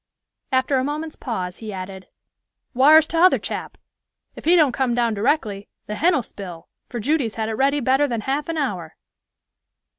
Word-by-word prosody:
After 260 Hz, +1 st, +2 dB
a -, -, 0 dB
moment's 305 Hz, +3 st, -4 dB
pause, 185 Hz, -8 st, -5 dB
he 220 Hz, -2 st, -6 dB
added, 190 Hz, 0 st, -7 dB, 0.7 s
"Whar's 300 Hz, +5 st, +7 dB
t'other 340 Hz, +4 st, +4 dB
chap? -, -, -6 dB, 0.6 s
If -, -, -11 dB
he 340 Hz, +3 st, +5 dB
don't 305 Hz, -6 st, +5 dB
come 245 Hz, -1 st, 0 dB
down 235 Hz, -2 st, +1 dB
directly, 210 Hz, -3 st, -1 dB, 0.2 s
the 210 Hz, -, -5 dB
hen'll 310 Hz, +2 st, +2 dB
spile, 180 Hz, -6 st, -9 dB, 0.2 s
for 240 Hz, -, -5 dB
Judy's 260 Hz, -1 st, 0 dB
had 220 Hz, -1 st, -2 dB
it -, -, -2 dB
ready 275 Hz, +5 st, +2 dB
better 265 Hz, +3 st, +3 dB
than 235 Hz, -4 st, -2 dB
half 275 Hz, +6 st, -2 dB
an 330 Hz, -, -2 dB
hour." 185 Hz, -, -3 dB
255 Hz, 170 wpm, -22 LUFS, 210-295 Hz, 0.7 s, Whar's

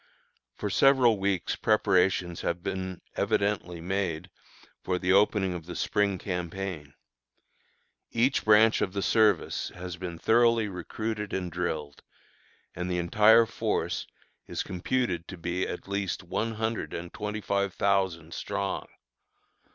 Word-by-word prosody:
For 105 Hz, -, -3 dB
several 130 Hz, -5 st, +5 dB
weeks 95 Hz, -2 st, 0 dB
preparations 95 Hz, -4 st, +2 dB
have 85 Hz, +1 st, -2 dB
been 95 Hz, -1 st, -4 dB
evidently 100 Hz, -4 st, 0 dB
made 90 Hz, -2 st, -2 dB, 0.5 s
for 90 Hz, -, -1 dB
the 90 Hz, +1 st, 0 dB
opening 100 Hz, -2 st, +3 dB
of 85 Hz, -2 st, -7 dB
the 90 Hz, -, -6 dB
Spring 105 Hz, -2 st, +1 dB
campaign. 90 Hz, -4 st, -5 dB, 1.1 s
Each 125 Hz, +4 st, +1 dB
branch 110 Hz, +1 st, +5 dB
of 95 Hz, -, -1 dB
the 100 Hz, -1 st, -2 dB
service 105 Hz, -6 st, +2 dB
has 90 Hz, -1 st, -6 dB
been 85 Hz, -1 st, -6 dB
thoroughly 115 Hz, +2 st, +3 dB
recruited 105 Hz, +3 st, -4 dB
and 90 Hz, -2 st, -2 dB
drilled, 80 Hz, -5 st, -3 dB, 0.7 s
and 90 Hz, +1 st, -3 dB
the 90 Hz, -, 0 dB
entire 105 Hz, +6 st, +5 dB
force -, -, -2 dB, 0.4 s
is -, -, -3 dB
computed 90 Hz, -2 st, -1 dB
to 95 Hz, -, -8 dB
be 85 Hz, +2 st, -2 dB
at -, -, -6 dB
least 100 Hz, -2 st, -2 dB
one 105 Hz, +6 st, -2 dB
hundred 110 Hz, -7 st, -3 dB
and 85 Hz, +1 st, -7 dB
twenty 105 Hz, 0 st, -4 dB
five 100 Hz, -2 st, -1 dB
thousand 95 Hz, -5 st, 0 dB
strong. -, -, -3 dB
95 Hz, 130 wpm, -28 LUFS, 90-105 Hz, 1.1 s, several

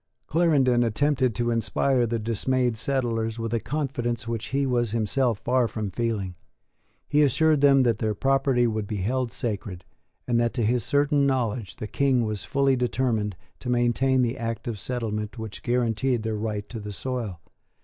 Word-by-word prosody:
Clarendon 145 Hz, -7 st, +3 dB
attempted 130 Hz, +1 st, +1 dB
to 120 Hz, +2 st, 0 dB
inspire 120 Hz, +2 st, +1 dB
the 115 Hz, +1 st, -1 dB
dismayed 120 Hz, +2 st, 0 dB
settlers 115 Hz, -3 st, -1 dB
with 115 Hz, 0 st, -3 dB
a 115 Hz, -, +2 dB
confidence 120 Hz, -4 st, -3 dB
which 115 Hz, -1 st, -3 dB
he 140 Hz, +1 st, 0 dB
was 120 Hz, -3 st, +1 dB
himself 115 Hz, +1 st, +1 dB
far 125 Hz, +2 st, +1 dB
from 105 Hz, -3 st, -4 dB
feeling. 110 Hz, -6 st, -2 dB, 0.7 s
He 150 Hz, -, +3 dB
assured 150 Hz, +1 st, +3 dB
them 135 Hz, -2 st, +6 dB
that 115 Hz, -3 st, +1 dB
their 110 Hz, -1 st, 0 dB
property 135 Hz, 0 st, +2 dB
would 110 Hz, -3 st, -1 dB
be 105 Hz, -, -3 dB
held 120 Hz, +5 st, -1 dB
sacred, 100 Hz, -6 st, -4 dB, 0.4 s
and 120 Hz, -1 st, +2 dB
that, 120 Hz, 0 st, 0 dB
to 120 Hz, -4 st, +1 dB
his 120 Hz, +1 st, +1 dB
certain 145 Hz, 0 st, +2 dB
knowledge, 120 Hz, -5 st, -1 dB
the -, -, -6 dB
King 130 Hz, +2 st, +1 dB
was 105 Hz, -2 st, -3 dB
fully 140 Hz, -1 st, +2 dB
determined 120 Hz, -5 st, 0 dB, 0.2 s
to 125 Hz, -, -6 dB
maintain 125 Hz, +2 st, +2 dB
the 120 Hz, +2 st, -2 dB
act 115 Hz, 0 st, -4 dB
of 110 Hz, -4 st, -3 dB
settlement 110 Hz, -2 st, -3 dB
which 110 Hz, -2 st, -7 dB
guaranteed 120 Hz, 0 st, 0 dB
their 110 Hz, -1 st, -2 dB
right 105 Hz, -1 st, -3 dB
to 115 Hz, -, -6 dB
the 105 Hz, 0 st, -6 dB
soil. 115 Hz, -4 st, -4 dB
120 Hz, 170 wpm, -25 LUFS, 110-130 Hz, 0.7 s, them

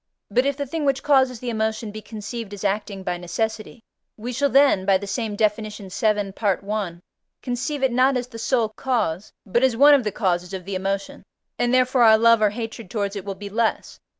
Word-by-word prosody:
But 250 Hz, +6 st, +2 dB
if 280 Hz, -1 st, -1 dB
the 285 Hz, -, -2 dB
thing 310 Hz, +3 st, -4 dB
which 275 Hz, -2 st, 0 dB
causes 265 Hz, -4 st, +3 dB
the 245 Hz, 0 st, -4 dB
emotion 220 Hz, 0 st, -2 dB
be 215 Hz, +1 st, -8 dB
conceived 215 Hz, -1 st, -7 dB
as 200 Hz, -, -10 dB
acting 200 Hz, -1 st, -2 dB
by 180 Hz, -1 st, -2 dB
necessity, 220 Hz, +6 st, -4 dB, 0.3 s
we 240 Hz, +3 st, -5 dB
shall 280 Hz, +3 st, +1 dB
then 275 Hz, -8 st, +4 dB
(by 195 Hz, 0 st, +4 dB
the 200 Hz, -, -7 dB
same 210 Hz, +1 st, -3 dB
Def. 210 Hz, 0 st, +2 dB
vii. 210 Hz, -1 st, -2 dB
Part 200 Hz, -1 st, -1 dB
I.) 200 Hz, -5 st, -3 dB, 0.4 s
conceive 260 Hz, +3 st, -3 dB
it 265 Hz, -, +3 dB
not 255 Hz, +2 st, +3 dB
as 250 Hz, -, -3 dB
the 230 Hz, -2 st, -9 dB
sole 230 Hz, -2 st, +1 dB
cause, 215 Hz, -7 st, -2 dB
but 225 Hz, +4 st, +1 dB
as 260 Hz, -3 st, +2 dB
one 290 Hz, +3 st, +8 dB
of 275 Hz, -3 st, +4 dB
the 210 Hz, -, -2 dB
causes 180 Hz, -1 st, -1 dB
of 185 Hz, -2 st, -7 dB
the 195 Hz, -, -5 dB
emotion, 195 Hz, +1 st, -3 dB, 0.4 s
and 240 Hz, -, +1 dB
therefore 255 Hz, 0 st, +3 dB
our 220 Hz, -2 st, +7 dB
love 230 Hz, 0 st, +5 dB
or 210 Hz, -, +4 dB
hatred 225 Hz, -1 st, -6 dB
towards 200 Hz, -1 st, -2 dB
it 200 Hz, -1 st, -6 dB
will 195 Hz, -1 st, -4 dB
be 200 Hz, +1 st, -8 dB
less. 225 Hz, +1 st, -1 dB
220 Hz, 215 wpm, -23 LUFS, 200-250 Hz, 0.4 s, one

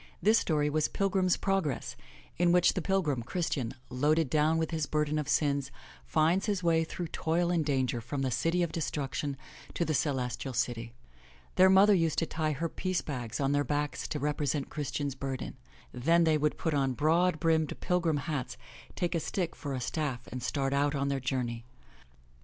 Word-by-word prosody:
This 215 Hz, +5 st, +4 dB
story 150 Hz, -3 st, +1 dB
was 155 Hz, +1 st, +1 dB
Pilgrim's 190 Hz, -2 st, +1 dB
Progress, 190 Hz, -9 st, -1 dB, 0.4 s
in 175 Hz, -1 st, +4 dB
which 180 Hz, 0 st, +5 dB
the 185 Hz, -, -2 dB
pil 190 Hz, +3 st, +1 dB
grim, 140 Hz, -6 st, -1 dB
Christian, 135 Hz, -3 st, -2 dB, 0.2 s
loaded 145 Hz, +3 st, +2 dB
down 155 Hz, +1 st, +3 dB
with 160 Hz, 0 st, -1 dB
his 160 Hz, -2 st, -1 dB
burden 150 Hz, 0 st, 0 dB
of 150 Hz, -2 st, -4 dB
sins, 140 Hz, -2 st, +1 dB, 0.4 s
finds 165 Hz, +6 st, +2 dB
his 200 Hz, -3 st, -1 dB
way 165 Hz, -1 st, +3 dB
through 170 Hz, +1 st, -5 dB
toil 170 Hz, +2 st, 0 dB
and 170 Hz, -3 st, +2 dB
danger 130 Hz, -4 st, 0 dB
from 135 Hz, +4 st, -3 dB
the 130 Hz, -, 0 dB
City 165 Hz, +8 st, +1 dB
of 170 Hz, -, -2 dB
Destruction 145 Hz, -3 st, -3 dB, 0.4 s
to 170 Hz, -, 0 dB
the 155 Hz, -, 0 dB
Celes 130 Hz, -4 st, 0 dB
tial 130 Hz, -3 st, -5 dB
City. 115 Hz, -1 st, -2 dB, 0.6 s
Their 185 Hz, +1 st, +6 dB
mother 195 Hz, +2 st, +7 dB
used 165 Hz, -5 st, +1 dB
to 165 Hz, -, +2 dB
tie 155 Hz, -1 st, -1 dB
her 165 Hz, +4 st, -2 dB
piece 185 Hz, +2 st, -2 dB
bags 120 Hz, -6 st, -5 dB
on 135 Hz, -1 st, +1 dB
their 145 Hz, 0 st, +2 dB
backs 145 Hz, 0 st, -2 dB
to 155 Hz, -, -3 dB
represent 145 Hz, -1 st, -1 dB
Christian's 140 Hz, -1 st, -3 dB
burden. 135 Hz, -1 st, -5 dB, 0.4 s
Then 165 Hz, +8 st, +3 dB
they 160 Hz, -1 st, +4 dB
would 150 Hz, +1 st, 0 dB
put 160 Hz, -, -1 dB
on 135 Hz, -2 st, +1 dB
broad 160 Hz, +4 st, +2 dB
brimmed, 160 Hz, -2 st, +1 dB
pilgrim 170 Hz, -4 st, +1 dB
hats, 145 Hz, -6 st, -3 dB, 0.4 s
take 175 Hz, 0 st, -1 dB
a 170 Hz, -, +1 dB
stick 175 Hz, +1 st, -2 dB
for 140 Hz, -2 st, -4 dB
a -, -, -2 dB
staff 130 Hz, -1 st, -3 dB
and 130 Hz, -, -5 dB
start 135 Hz, 0 st, -1 dB
out 145 Hz, +1 st, +1 dB
on 140 Hz, 0 st, 0 dB
their 140 Hz, -1 st, 0 dB
journey. 125 Hz, -3 st, -2 dB
150 Hz, 190 wpm, -30 LUFS, 135-170 Hz, 0.6 s, mother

